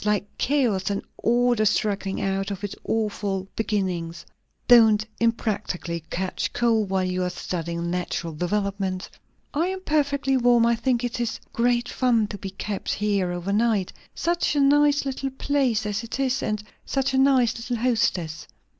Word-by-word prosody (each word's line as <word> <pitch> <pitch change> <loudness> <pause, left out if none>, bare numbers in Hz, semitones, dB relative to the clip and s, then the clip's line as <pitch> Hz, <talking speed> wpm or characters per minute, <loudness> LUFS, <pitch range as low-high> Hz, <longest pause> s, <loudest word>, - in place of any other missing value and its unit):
Like 210 -1 +1
chaos, 245 -10 +1
and 200 0 -2 0.2
order 240 -1 +2
struggling 200 -2 0
out 195 0 -1
of 200 0 -5
its 205 - -3
awful 205 -3 -1
beginnings." 185 -6 -2 0.4
"Don't 220 -3 +6
unpractically 205 -7 -1
catch 185 +1 -2
cold, 225 -4 +2
while 190 -1 +1
you 185 0 -1
are 180 - 0
studying 170 -1 -4
natural 175 -2 -3
developement." 195 +2 -2 0.5
"I 320 +4 +1
am 380 0 -3
perfectly 285 -4 +1
warm. 240 -1 +4
I 235 - +4
think 240 +1 0
it 245 0 -2
is 235 -2 -2
great 240 0 +1
fun 240 -4 +2
to 205 - -6
be 195 - -5
kept 195 +1 -4
here 200 -3 0
over 175 +3 -3
night. 215 -3 +1 0.2
Such 345 -2 0
a - - +2
nice 290 +1 +4
little 270 0 -2
place 265 -5 0
as 210 +1 -2
it 230 +3 -5
is, 265 -1 +1
and 210 0 -2 0.2
such 270 0 -1
a 265 - +3
nice 265 -4 +4
little 240 +1 -3
hostess. 220 -9 0
215 Hz, 160 wpm, -24 LUFS, 195-245 Hz, 0.5 s, Don't